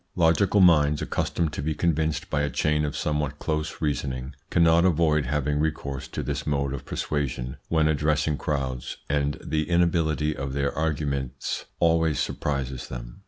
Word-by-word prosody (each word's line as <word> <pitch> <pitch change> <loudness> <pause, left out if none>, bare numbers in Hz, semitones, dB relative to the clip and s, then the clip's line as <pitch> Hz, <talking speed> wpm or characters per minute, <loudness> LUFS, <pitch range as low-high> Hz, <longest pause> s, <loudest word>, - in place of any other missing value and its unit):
Logical 90 +4 +4
minds, 75 -4 +5
accustomed 80 -3 -1
to 70 - -3
be 75 +1 -1
convinced 80 -2 0
by 75 - +1
a 75 - 0
chain 75 +3 +1
of 70 - -3
somewhat 75 -1 -1
close 75 +1 -3
reasoning, 70 -2 -2 0.2
cannot 85 0 +4
avoid 80 -5 +3
having 75 +1 0
recourse 75 -3 -2
to - - -4
this - - -3
mode 70 -2 0
of 70 - -6
persuasion 65 -4 -3
when 80 -2 +3
addressing 75 0 +1
crowds, 65 -5 -3
and 70 0 0
the 75 0 -1
inability 80 -3 +2
of 70 -1 -4
their 70 0 -1
arguments 70 -5 -2
always 80 -2 +3
surprises 65 -3 -2
them. - - -8
75 Hz, 155 wpm, -26 LUFS, 70-80 Hz, 0.2 s, minds